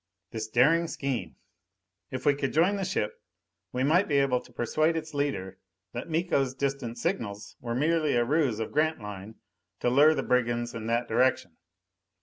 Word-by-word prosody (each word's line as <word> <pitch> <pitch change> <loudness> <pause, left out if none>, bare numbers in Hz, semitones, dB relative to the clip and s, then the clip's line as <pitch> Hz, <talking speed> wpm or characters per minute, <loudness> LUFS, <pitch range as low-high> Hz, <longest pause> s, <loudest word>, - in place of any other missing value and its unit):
This 110 -1 -4
daring 150 +9 +3
scheme! 130 - -3 0.7
If 130 0 -6
we 145 - +5
could 140 -1 -2
join 175 +6 +3
the 195 - -2
ship, 180 - -2 0.5
we 125 - -1
might 170 +8 +3
be 145 - +2
able 135 -3 +2
to - - -18
persuade 155 +7 +1
its 155 -1 -6
leader 140 -10 -2 0.3
that 120 - -5
Miko's 155 -6 0
distant 135 -4 -2
signals 110 - -3
were 120 -1 -4
merely 155 +1 +2
a 120 0 +3
ruse 140 -5 +1
of 110 - -3
Grantline 110 -9 -2 0.4
to 120 - +1
lure 150 +5 +6
the - - -1
brigands 120 -1 0
in 115 -1 -5
that 120 +1 0
direction. 120 -7 +1
130 Hz, 165 wpm, -28 LUFS, 115-155 Hz, 0.7 s, lure